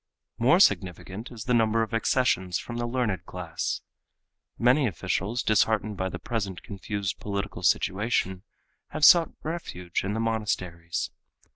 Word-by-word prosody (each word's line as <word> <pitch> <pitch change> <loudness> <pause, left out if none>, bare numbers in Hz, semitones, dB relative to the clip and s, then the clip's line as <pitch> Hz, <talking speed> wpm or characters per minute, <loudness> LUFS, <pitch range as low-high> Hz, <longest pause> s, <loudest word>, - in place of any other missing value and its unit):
More 135 +10 +5
significant 95 - +1
is 115 -3 -7
the 125 - 0
number 115 -1 +3
of 110 - -6
accessions 115 -6 +1
from 120 - -6
the 120 0 -1
learned 120 -6 -1
class. 90 -3 -3 0.8
Many 125 +3 +4
officials, 105 - -2
disheartened 110 0 +2
by 95 0 -2
the 90 - -5
present 100 -1 -4
confused 100 -2 -4
political 100 -3 -4
situation, 95 +1 +1 0.5
have 155 -1 +2
sought 170 +1 +8
refuge 90 - -4
in 100 +2 -2
the - - -1
monasteries. 95 -7 -2
105 Hz, 135 wpm, -27 LUFS, 95-120 Hz, 0.8 s, sought